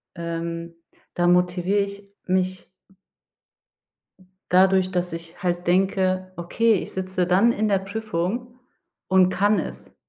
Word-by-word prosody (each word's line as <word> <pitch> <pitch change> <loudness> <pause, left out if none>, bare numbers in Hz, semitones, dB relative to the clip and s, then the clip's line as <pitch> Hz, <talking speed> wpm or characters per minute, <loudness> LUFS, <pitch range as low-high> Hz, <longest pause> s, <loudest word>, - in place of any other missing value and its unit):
ähm, 170 0 -5 0.4
da 175 0 +1
motivier 180 +3 +2
ich 200 0 -7
mich 185 0 -1 1.8
dadurch, 185 0 +4
dass 180 -1 -2
ich 165 +3 -9
halt 175 -1 -1
denke: 185 0 +1
„Okay, 220 +7 +1
ich 190 - -2
sitze 185 -1 -2
dann 195 +7 +4
in 215 0 0
der 195 -1 +3
Prüfung 220 +4 -4 0.5
und 185 -1 +4
kann 205 +2 +2
es.“ - - -8
185 Hz, 120 wpm, -23 LUFS, 175-200 Hz, 1.8 s, dadurch